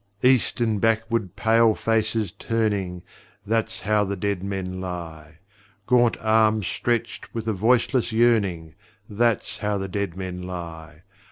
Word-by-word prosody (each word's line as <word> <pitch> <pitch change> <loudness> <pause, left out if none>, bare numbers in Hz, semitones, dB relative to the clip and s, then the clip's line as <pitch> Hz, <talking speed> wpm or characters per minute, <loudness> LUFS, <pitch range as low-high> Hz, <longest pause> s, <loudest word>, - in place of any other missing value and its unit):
East 125 -1 +3
and 110 -4 0
backward 115 -3 0
pale 115 -1 +4
faces 110 -3 0
turning 100 -5 -2 0.4
That's 115 +1 -1
how 105 +1 +2
the 100 0 -2
dead 100 -1 -2
men 95 -2 -4
lie! 80 -4 -7 0.5
Gaunt 120 0 +3
arms 110 -1 +3
stretched 120 +3 -2
with 115 -1 -4
a 110 - +1
voiceless 120 +4 +2
yearning 100 -9 +2 0.3
That's 115 +2 0
how 105 -1 -1
the 95 0 -3
dead 95 -2 -3
men 90 -1 -5
lie! 85 -3 -8
105 Hz, 135 wpm, -24 LUFS, 90-115 Hz, 0.5 s, pale